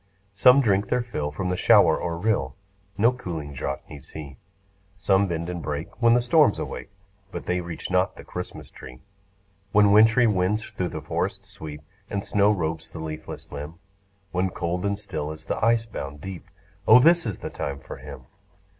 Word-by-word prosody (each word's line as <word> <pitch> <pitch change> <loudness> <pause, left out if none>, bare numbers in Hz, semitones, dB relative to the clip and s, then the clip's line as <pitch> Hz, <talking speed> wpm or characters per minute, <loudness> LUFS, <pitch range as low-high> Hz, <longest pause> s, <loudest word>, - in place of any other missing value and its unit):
Some 125 +8 +6
drink 100 -4 +2
their 125 -1 +1
fill 75 -12 -3
from 90 +5 -3
the - - 0
shower - - +5
or 85 -1 -3
rill; 85 -9 0 0.4
No 115 +4 +5
cooling 85 - -6
draught 70 0 -4
needs 70 -2 -12
he; 70 -4 -9 0.6
Some 95 +1 +3
bend 85 -1 -3
and 90 -1 -4
break 75 +8 -5
when 115 0 +6
the 120 - +3
storms 140 -1 +4
awake, 60 - -6 0.4
But 85 - -6
they 90 0 0
reach 85 +1 -6
not 90 +1 +2
the - - -11
Christmas 90 0 -7
tree. 65 0 -12 0.7
When 105 -1 +6
wintry 115 +4 +6
winds 105 +1 +1
thro' 90 - -3
the 80 -3 -6
forests 75 - -3
sweep, 75 -1 -8 0.3
And 100 -1 -3
snow 105 0 +3
robes 80 -4 -2
the - - -10
leafless 80 -1 -7
limb; 75 +3 -7 0.6
When 90 +1 0
cold 90 +2 -2
and 100 0 -1
still 80 -7 -5
is 80 0 -10
the - - -3
ice 115 0 +3
bound 75 -9 -7
deep, 95 +1 -8 0.4
O 110 - +10
this 165 +2 +5
is 105 - -3
the - - -6
time 70 -1 -4
for - - -9
him. - - -10
90 Hz, 185 wpm, -25 LUFS, 80-105 Hz, 0.7 s, O